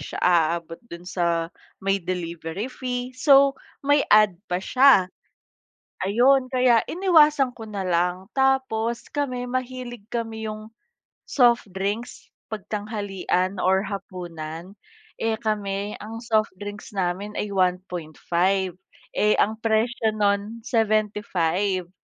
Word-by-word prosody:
siya - - -7
aabot 170 -1 +1
dun 170 +1 -9
sa 170 -2 -1 0.3
may 195 0 +1
delivery 170 +1 -4
fee, 250 -1 -4
so 275 +1 +5 0.3
may 285 +1 +4
add 210 -4 +5
pa 180 - 0
siya. 200 -1 +4 1.0
Ayon 255 +5 +4
kaya 250 -3 +4
iniwasan 305 -7 +4
ko 225 -2 -10
na 200 -2 -4
lang. 180 +3 -1
Tapos 260 -4 +1
kami 255 -4 -2
mahilig 250 -3 -5
kami 225 -2 -4
yung 215 +1 -8 0.5
soft 240 -4 +3
drinks, 200 +5 -4 0.2
'pag 215 -2 -6
tanghalian 200 -3 -2
or 190 +1 +2
hapunan. 180 -2 -7 0.4
Eh, 225 0 +1
kami 205 -2 -3
ang 225 +2 -8
soft 220 -3 +1
drinks 205 0 -8
namin 190 +2 -2
ay 210 - -3
1.5. 180 0 0 0.3
Eh, 210 0 +2
ang 220 +2 +1
presyo 225 0 +1
nun 205 +2 0
75, 205 -5 0
210 Hz, 115 wpm, -24 LUFS, 185-235 Hz, 1.0 s, so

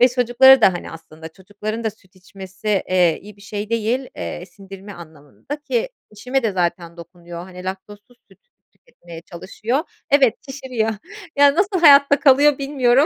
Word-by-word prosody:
çocuklara 250 +1 +5
da, 190 - +5
hani, 175 - -7
aslında, 160 0 -12
çocukların 205 +5 -7
da 220 - 0
süt 195 -3 -23
içmesi, 190 +2 -12 0.2
eee, 180 -3 +2
iyi 205 +1 -13
bir - - -19
şey 205 +1 -6
değil, 230 +3 -1
eee, 175 - -6
sindirme 195 +1 -13
anlamında 160 - -10
ki 480 +10 -2 0.2
eşime 250 +5 -3
de 220 - 0
zaten 175 -2 -3
dokunuyor, 170 0 -11
hani, 180 -1 -12
laktozsuz 205 +5 -9
süt - - -22 0.3
tüketmeye 175 - -15
çalışıyor 200 - -4 0.3
Evet, 275 -5 +4
şişiriyor. 255 -5 -3 0.5
Yani, 285 +1 +5
nasıl 385 0 0
hayatta 280 -2 +6
kalıyor, 285 +1 +4
bilmiyorum. 275 -1 +2
210 Hz, 150 wpm, -20 LUFS, 185-265 Hz, 0.5 s, hayatta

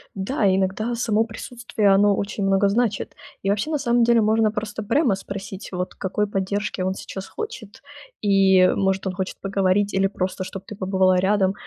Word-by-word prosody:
Да, 200 +3 0
иногда 195 +5 0
само 225 -2 +1
присутствие 230 -1 -2
оно 200 +1 +4
очень 200 0 -3
много 195 +1 +3
значит. 215 -1 -1 0.3
И 195 - 0
вообще, 205 +8 0
на 305 - +1
самом 240 -3 +2
деле, 235 0 +4
можно 220 0 +2
просто 215 0 -4
прямо 250 0 +2
спросить, 195 0 -7
вот, 180 -1 -3
какой 205 +2 -1
поддержки 200 0 -2
он 185 +1 0
сейчас 190 0 -8
хочет. 260 - -8 0.4
И, 195 -2 +5
может, 195 0 0
он 185 - -2
хочет 190 0 -4
поговорить 195 +1 +1
или 195 0 +2
просто, 185 -1 -3
чтобы 195 +1 -8
ты 210 - -8
побывала 190 -1 +2
рядом. 190 0 +2
200 Hz, 175 wpm, -23 LUFS, 190-220 Hz, 0.4 s, И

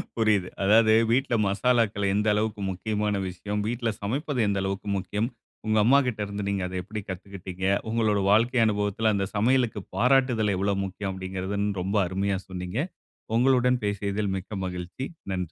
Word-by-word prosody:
புரியுது. 105 -5 +2
அதாவது 110 +2 +5 0.2
வீட்ல 130 0 +1
மசாலாக்கள் 105 -1 +1
எந்த 105 +1 +1
அளவுக்கு 105 0 -1
முக்கியமான 105 +2 -1
விஷயம். 100 +3 -4
வீட்ல 120 0 -1
சமைப்பது 135 +5 -2
எந்த 100 -1 0
அளவுக்கு 95 +1 -3
முக்கியம், 105 +4 -2 0.4
உங்க 110 0 +2
அம்மாகிட்ட 125 -2 +3
இருந்து 100 0 -5
நீங்க 100 -1 -1
அத 90 - -7
எப்படி 105 +2 -6
கத்துகிட்டீங்க, 95 0 -6 0.2
உங்களோட 110 -2 +2
வாழ்க்கை 120 +3 +3
அனுபவத்தில 105 +1 +1
அந்த 100 - 0
சமையலுக்கு 115 -1 +2 0.2
பாராட்டுதல் 125 -3 +3
எவ்வளவு 100 +1 0
முக்கியம் 95 +1 -4
அப்படின்கிறது 95 +1 -4 0.2
ரொம்ப 100 +4 -2
அருமையா 95 +1 -1
சொன்னீங்க. 90 +4 -4 0.6
உங்களுடன் 125 0 +3
பேசியதில் 100 0 -1
மிக்க 95 +4 -8
மகிழ்ச்சி 90 +8 -5 0.3
நன்றி. 95 - -1
105 Hz, 145 wpm, -26 LUFS, 95-115 Hz, 0.6 s, அதாவது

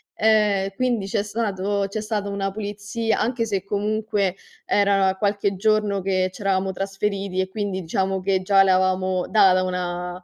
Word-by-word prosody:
ehm, 210 -3 +2
quindi 240 -3 0
c'è 200 +1 -1
stato 205 -2 -1
c'è 210 +2 -4
stata 210 -1 -2
una 200 -1 -2
pulizia 210 +2 -3
anche 235 -1 0
se, 195 -4 -2
comunque, 205 -1 -1 0.3
era 195 -2 +2
qualche 200 0 0
giorno 210 0 +1
che 185 0 0
ci - - -11
eravamo 190 -1 0
trasferiti 195 0 -3
e 190 - +1
quindi 200 -1 -3
diciamo 190 +3 -1
che 190 0 0
già 195 +1 +5
l'avevamo 185 -1 +1
data 190 -3 +5
una 180 0 -3
195 Hz, 150 wpm, -23 LUFS, 190-210 Hz, 0.3 s, già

